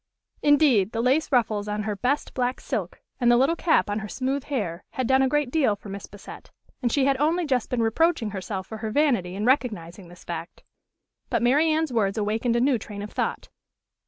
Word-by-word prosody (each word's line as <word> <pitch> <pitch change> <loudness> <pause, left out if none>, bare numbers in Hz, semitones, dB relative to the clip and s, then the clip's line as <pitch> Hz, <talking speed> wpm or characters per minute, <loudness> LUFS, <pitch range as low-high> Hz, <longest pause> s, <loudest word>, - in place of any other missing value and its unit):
Indeed, 275 -9 +4
the 225 - -2
lace 275 +6 +2
ruffles 220 -5 +1
on 210 0 -2
her 210 -1 -2
"best" 255 +8 -1
black 250 0 -1
silk, 205 - -4 0.2
and 240 - +3
the 240 - +5
little 270 +7 +3
cap 335 -1 +2
on 205 +1 -2
her 215 - -6
smooth 265 +5 -2
hair, 200 - -3
had 260 - -1
done 265 +3 +3
a 265 - +3
great 295 -1 0
deal 270 -9 +2
for 200 0 -12
Miss 195 0 -7
Bassett; 205 0 -12 0.3
and 240 -3 0
she 275 +1 +2
had 275 -1 +2
only 325 +5 +1
just 255 -5 0
been 240 -2 0
reproaching 225 -1 +1
herself 190 -1 -5
for 220 - -8
her 220 0 -3
vanity 230 -9 +1
in 205 +2 -2
recognizing 210 - 0
this 175 +1 -15
fact. 170 0 -7 0.7
But - - 0
Mary 290 +7 +4
Anne's 310 -3 0
words 200 -3 +1
awakened 220 +3 0
a - - +3
new 260 -2 +2
train 205 -1 -7
of 210 - -8
thought. - - -3
240 Hz, 215 wpm, -25 LUFS, 205-275 Hz, 0.7 s, the